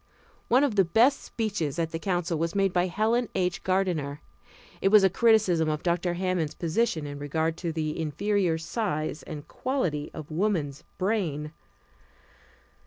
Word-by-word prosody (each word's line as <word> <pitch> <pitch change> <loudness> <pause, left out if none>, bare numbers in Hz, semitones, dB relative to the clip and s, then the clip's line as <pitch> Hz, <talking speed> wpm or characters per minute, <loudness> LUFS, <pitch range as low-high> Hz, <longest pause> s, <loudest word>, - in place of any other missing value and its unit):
One 255 +4 +4
of 250 -8 0
the 195 - +7
best 225 +10 +3
speeches 200 - -3
at 165 -1 -1
the 165 - -3
council 175 -3 -1
was 165 +2 -1
made 195 -2 +2
by 180 0 +2
Helen 225 +5 +1
H. 180 -1 0
Gardener. 175 -7 0 0.6
It - - +3
was 210 0 +7
a 190 - +5
criticism 200 -8 +3
of 150 0 -2
Dr. 175 0 0
Hammond's 180 -4 -1
position 165 -2 0
in 145 0 -6
regard 160 +3 -1
to 170 -2 -3
the 155 0 -3
inferior 175 +3 0
size 160 - -2
and 150 -3 -8
quality 180 - -2
of 155 -1 -9
woman's 155 -6 -1
brain. 170 -7 -1
175 Hz, 155 wpm, -27 LUFS, 155-200 Hz, 0.6 s, the